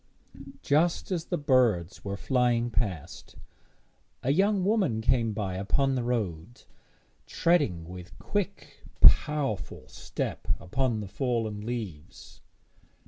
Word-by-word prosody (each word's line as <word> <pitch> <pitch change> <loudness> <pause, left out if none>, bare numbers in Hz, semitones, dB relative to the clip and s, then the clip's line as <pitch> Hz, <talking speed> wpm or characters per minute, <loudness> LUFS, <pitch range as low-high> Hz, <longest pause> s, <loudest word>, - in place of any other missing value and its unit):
Just 165 +6 +1
as 170 -3 -1
the 175 - -2
birds 120 - +2
were 100 0 -4
flying 120 -1 +1
past, 100 - -4 0.9
a 135 - +2
young 195 +2 +2
woman 195 - +1
came 115 0 +1
by 100 -3 -3
upon 120 +9 +1
the 130 - 0
road, 115 -4 -3 0.6
treading 145 - +1
with 90 0 -10
quick 205 -1 -4 0.2
powerful 140 - +3
step - - -5
upon 110 +4 -1
the 105 - -6
fallen 115 -1 -2
leaves. 105 -10 -7
120 Hz, 110 wpm, -28 LUFS, 100-145 Hz, 0.9 s, powerful